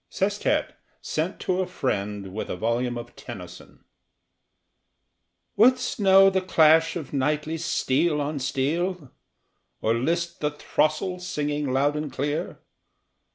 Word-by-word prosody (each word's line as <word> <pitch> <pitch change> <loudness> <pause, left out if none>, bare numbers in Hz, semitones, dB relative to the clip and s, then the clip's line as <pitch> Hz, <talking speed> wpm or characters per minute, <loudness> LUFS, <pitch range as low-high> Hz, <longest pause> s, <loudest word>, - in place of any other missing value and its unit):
SESTET 205 +2 0 0.3
SENT 165 +5 -3
TO 185 0 0
A 185 - -2
FRIEND 105 - -3
WITH 110 - -4
A - - -2
VOLUME 120 +4 -1
OF 120 0 -9
TENNYSON - - -11 1.7
Wouldst 250 +4 +3
know 195 -1 +6
the 190 0 +1
clash 160 -3 +4
of 155 -6 -6
knightly 150 +3 -1
steel 155 -1 +1
on 145 0 -2
steel? 150 +4 -1 0.7
Or 110 - +1
list 170 +8 -1
the 150 - 0
throstle 155 +4 -1
singing 150 -5 -2
loud 140 +3 +2
and 150 -2 -3
clear? 145 +3 -3
150 Hz, 120 wpm, -25 LUFS, 130-180 Hz, 1.7 s, know